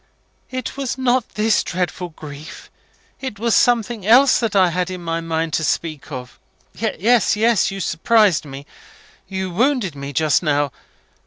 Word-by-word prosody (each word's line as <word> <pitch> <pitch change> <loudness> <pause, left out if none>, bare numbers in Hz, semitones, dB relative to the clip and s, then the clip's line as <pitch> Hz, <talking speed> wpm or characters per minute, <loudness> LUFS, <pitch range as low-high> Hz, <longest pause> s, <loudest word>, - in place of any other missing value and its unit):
"It 255 +1 -5
was 270 -2 -3
not 255 -2 +1
this 215 +1 +2
dreadful 180 0 -3
grief 155 -1 -11 0.5
it 260 -6 -5
was 230 +1 +1
something 235 -3 +2
else 255 +7 +5
that 225 -3 -2
I 185 -2 +5
had 180 +1 -1
it 185 - -4
in 180 - -9
my 165 0 -2
mind 165 -1 -2
to 160 - 0
speak 155 -1 -2
of. 125 -2 -8 0.3
Yes, 225 +4 +1
yes. 225 0 +2
You 195 - -6
surprised 195 +1 +2
me 140 -1 -9 0.6
you 190 -1 -4
wounded 235 - +1
me 140 0 -6
just 150 0 +2
now. 145 -4 +1
185 Hz, 160 wpm, -20 LUFS, 160-230 Hz, 0.6 s, else